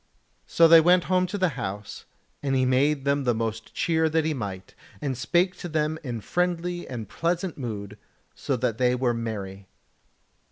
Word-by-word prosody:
So 165 - +5
they 165 0 +8
went 175 +2 +4
home 185 0 +1
to 205 - -4
the 185 -2 +2
house, 105 -7 -6 0.4
and 135 -1 0
he 130 -1 +2
made 135 +2 +2
them 140 0 +1
the 120 -3 +1
most 110 0 -4
cheer 160 -1 +1
that 160 0 +1
he 160 - 0
might, 95 -7 -6 0.3
and 140 -3 -2
spake 175 +9 +1
to 175 - -6
them 155 0 -1
in 120 -5 -4
friendly 175 - -1
and 120 -4 -6
pleasant 175 +1 -2
mood, 105 -5 -6 0.3
so 140 -2 -2
that 115 -2 -1
they 125 0 +3
were 125 -1 +1
merry. 100 -4 -5
135 Hz, 175 wpm, -26 LUFS, 115-165 Hz, 0.4 s, they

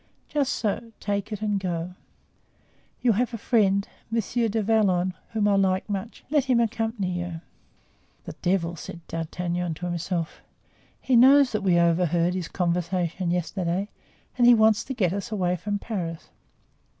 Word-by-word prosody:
"Just 285 -3 0
so, 225 +1 -2
take 200 +1 -2
it 210 0 -4
and 205 -2 0
go. 175 -1 -3 1.1
You 245 -1 +4
have 235 +3 0
a - - -4
friend, 200 -3 +2 0.2
Monsieur 230 +1 0
du 220 +1 0
Vallon, 190 -4 +2 0.2
whom 215 -2 0
I 205 - +4
like 190 -1 +1
much; 205 +2 -5
let 295 -4 +3
him 255 -3 +3
accompany 225 -4 -1
you." 175 -2 -5 0.8
"The - - -6
devil!" 175 -2 0
said 170 +1 -9
D'Artagnan 175 +1 -3
to 175 - -6
himself. 175 -1 -3 0.6
"He 260 - +1
knows 270 +2 +7
that 215 - -1
we 185 -3 +3
overheard 170 0 +2
his 180 -2 -3
conversation 175 0 -1
yesterday 180 +2 -1 0.5
and 240 - +6
he 245 - +9
wants 220 -1 +4
to 265 - -5
get 185 -7 +1
us 200 +1 -4
away 180 -4 0
from 205 +4 -3
Paris." 180 -7 -5
195 Hz, 155 wpm, -25 LUFS, 175-225 Hz, 1.1 s, he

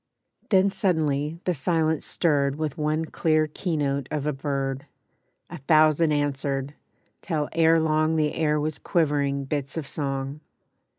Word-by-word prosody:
Then 195 -1 +4
suddenly 155 -6 0
the 180 - 0
silence 160 +1 0
stirred 140 -5 +1
With 155 -2 -3
one 155 +1 -1
clear 155 -1 +1
keynote 145 -4 -2
of 150 -2 -3
a 150 - 0
bird; 135 -1 -3 0.6
A 175 - -9
thousand 155 +2 +4
answered, 140 -1 -1 0.5
till 155 -5 -2
ere 165 0 +4
long 155 0 +1
The 155 -1 +1
air 150 -2 +1
was 155 0 -2
quivering 145 -5 0
bits 140 +1 -4
of 160 - -3
song. 135 0 -4
150 Hz, 135 wpm, -25 LUFS, 140-160 Hz, 0.6 s, Then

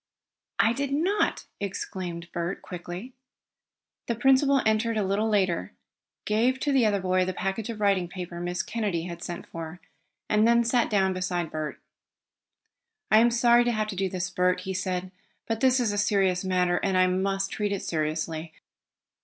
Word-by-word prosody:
"I 225 - +4
did 275 +2 -2
not!" 355 +9 +1
exclaimed 180 -3 -5
Bert 175 +2 -3
quickly. 180 +7 -7 0.9
The 235 - 0
principal 270 +2 +4
entered 220 +1 +1
a 210 - +1
little 200 +3 0
later, 190 -5 0 0.5
gave 235 +5 +2
to 290 - +1
the 260 -5 +4
other 205 -1 +1
boy 185 0 +2
the 185 0 -3
package 195 +4 -3
of 225 -2 -5
writing 195 -4 +2
paper 175 -1 -7
Miss 175 +1 -2
Kennedy 205 -8 -2
had 170 -1 -7
sent 175 -1 -6
for, 165 +1 -7 0.5
and 215 +1 +3
then 235 0 +5
sat 240 +1 +2
down 190 -3 +2
beside 180 -2 -2
Bert. 155 -1 -4 1.3
"I 215 - +8
am 235 +1 +5
sorry 240 0 +4
to 240 - +1
have 215 -2 -1
to 200 - -4
do 190 0 0
this, 180 -1 -3
Bert," 180 +1 +1
he 190 - -4
said, 185 0 -3 0.3
"but 225 -1 -2
this 260 +1 +4
is 235 -4 +1
a 205 - -1
serious 195 -3 +2
matter 180 -1 +1
and 190 -2 0
I 185 - +5
must 195 +1 0
treat 210 -1 -1
it 200 - -2
seriously. 155 0 -2
195 Hz, 175 wpm, -27 LUFS, 180-225 Hz, 1.3 s, I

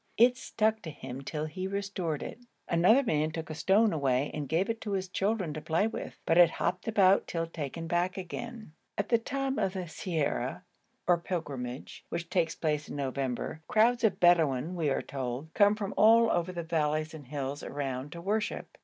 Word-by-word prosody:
It 245 +2 +6
stuck 220 -3 0
to 160 - -6
him 130 -3 -7
till 150 +2 -3
he 185 +4 -4
restored 195 -6 -2
it. - - -7 0.3
Another 185 +11 +5
man 155 - +1
took 160 0 -6
a - - -3
stone 205 +6 +3
away 135 -2 +1
and 145 -3 -4
gave 170 +5 +2
it 230 0 -3
to 205 - -3
his 190 -1 -1
children 190 -3 -1
to 155 - -5
play 160 +5 +1
with, 225 - -5
but 165 +1 +4
it 175 -2 +8
hopped 180 +4 -2
about 200 -3 +4
till 165 -1 -2
taken 165 0 -5
back 175 +2 0
again. 215 +1 -7 0.2
At 200 - -1
the 235 - +4
time 270 +2 -2
of 195 -3 0
the 190 - -3
ziara 160 - -2 0.4
or 175 -1 +4
pilgrimage 140 -8 -5
which 170 0 -4
takes 165 -3 +1
place 150 -2 -1
in - - -6
November, 135 +1 -3
crowds 235 +3 +3
of 215 -4 +2
Bedouin, 165 -3 +4
we 165 -5 0
were - - 0
told, 135 +3 -5
come 205 0 +5
from 205 -2 -4
all 225 +1 +6 0.2
the 175 -1 -5
valleys 155 -1 0
and 150 -5 -10
hills 140 0 -4
around 135 -1 -4
to 170 - -7
worship. 210 +4 -2
170 Hz, 190 wpm, -30 LUFS, 150-200 Hz, 0.4 s, it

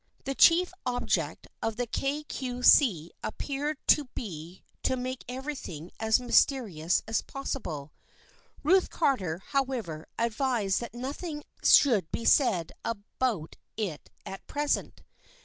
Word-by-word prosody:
The 275 - -2
chief 350 +6 +5
object 220 - -1 0.2
of 225 -1 -1
the 245 +2 -1
Kay 275 +5 -2
Cue 250 -4 -5
See 180 - +5
appeared 285 +6 -3
to 295 - +6
be 175 -4 -7 0.2
to 260 - 0
make 255 0 -4
everything 250 - -6
as 220 +2 +3
mys 245 -1 +6
terious 185 - -1
as 225 - +1
possible. 160 - -5 0.7
Ruth 370 +5 +4
Carter, 195 - 0
however, 255 - -2
advised 230 -3 +1
that 235 0 -7
nothing 295 +5 -5 0.2
should 215 - +5
be 230 - -3
said 185 - +3
about 210 -4 -3 0.2
it 195 -9 -4 0.2
at 195 - -8
present. 290 0 -1
245 Hz, 125 wpm, -29 LUFS, 190-275 Hz, 0.7 s, to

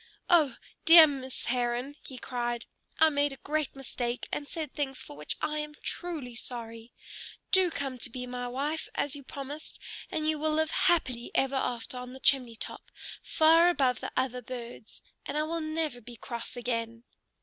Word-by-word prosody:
"Oh, 305 -8 +5 0.3
dear 330 -1 +11
Miss 265 -3 -3
Heron!" 245 +2 0
he 260 - -9
cried. 240 -1 -3 0.3
"I 320 - +7
made 285 0 +2
a - - -10
great 305 0 -1
mistake, 245 -2 -3
and 290 - -3
said 310 -4 -5
things 270 -3 -2
for 145 - -10
which 150 +1 -3
I 305 0 0
am 300 0 -5
truly 315 -9 -3
sorry. 230 -1 -6 0.6
Do 375 -2 +5
come 270 -5 -4
to 245 - -1
be 250 +1 -5
my 245 0 -4
loving 245 - -5
wife, 300 +4 -2
as 290 0 0
you 285 - -7
promised, 280 +3 -7 0.3
and 310 - -2
we 315 - +3
will 310 0 0
live 315 0 +2
happily 255 -9 +2
ever 270 0 +2
after 250 -2 -2
on 250 0 -7
the 265 - -9
chimney 255 -4 +4
top, - - -7 0.3
far 330 +2 +6
above 265 -7 +2
the - - -5
other 250 -1 0
birds. 240 -3 -8 0.2
And 285 - -2
I 305 - +2
will 330 +1 -2
never 310 -5 -2
be 240 +2 -10
cross 235 +1 -6
again." 230 -1 -2
265 Hz, 185 wpm, -30 LUFS, 245-305 Hz, 0.6 s, dear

